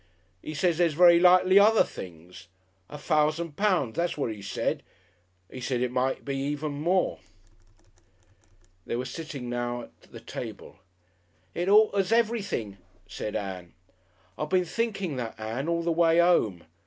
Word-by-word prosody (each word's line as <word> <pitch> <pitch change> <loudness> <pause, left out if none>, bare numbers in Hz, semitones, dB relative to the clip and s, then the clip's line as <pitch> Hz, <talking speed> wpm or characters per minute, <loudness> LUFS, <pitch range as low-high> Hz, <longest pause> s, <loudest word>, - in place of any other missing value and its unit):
'E 155 - -7
says 170 +2 +1
there's 170 -4 +2
very 170 0 +7
likely 185 +2 +6
other 215 +2 +5
things. 90 +1 -11 0.4
A 150 - -8
fousand 155 +2 0
pounds, 185 - +1
that's 170 0 -1
what 135 -6 -1
'e 105 -2 -8
said. 100 - -2 0.7
'E 130 - -7
said 125 0 -2
it 125 -1 -1
might 130 +2 -1
even 145 +2 -2
be 145 - -6
more."... 180 +4 +1 1.7
They - - -2
were 125 +2 -3
sitting 145 -5 -7
now 120 0 -3
at - - -17
the - - -10
table. - - -8 0.7
"It 175 +2 -2
alters 205 -2 +4
everything," 210 - 0 0.3
said 105 - -6
Ann. 95 -4 -5 0.7
"I 150 - -1
been 180 +3 +1
thinking 195 - -2
that, 115 -3 -5
Ann, 115 +7 -4
all 170 0 0
the 170 - 0
way 165 0 +3
'ome. 115 - +2
155 Hz, 150 wpm, -27 LUFS, 120-180 Hz, 1.7 s, very